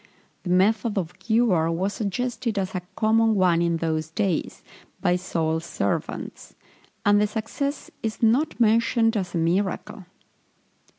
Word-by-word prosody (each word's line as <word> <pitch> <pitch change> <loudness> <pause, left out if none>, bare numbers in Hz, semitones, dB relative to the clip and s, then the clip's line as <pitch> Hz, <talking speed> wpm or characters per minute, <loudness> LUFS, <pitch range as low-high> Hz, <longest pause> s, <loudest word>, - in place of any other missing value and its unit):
The 180 - -6
method 205 +4 +2
of 180 -2 -3
cure 220 -8 +2
was 190 +5 -1
suggested 230 +1 -2
as 190 -1 -2
a 185 - -2
common 225 0 +3
one 180 -3 +3
in 170 -1 +1
those 160 -1 -2
days, 185 -1 -2 0.4
by 180 - +2
Saul's 165 -3 -1
servants; - - -4 0.5
and 205 0 +5
the 210 - +3
success 235 +7 -4
is 220 +1 -4
not 250 +8 +2
mentioned 230 0 +3
as 185 -4 -2
a - - +1
miracle. 185 +3 -1
200 Hz, 135 wpm, -24 LUFS, 175-225 Hz, 0.5 s, and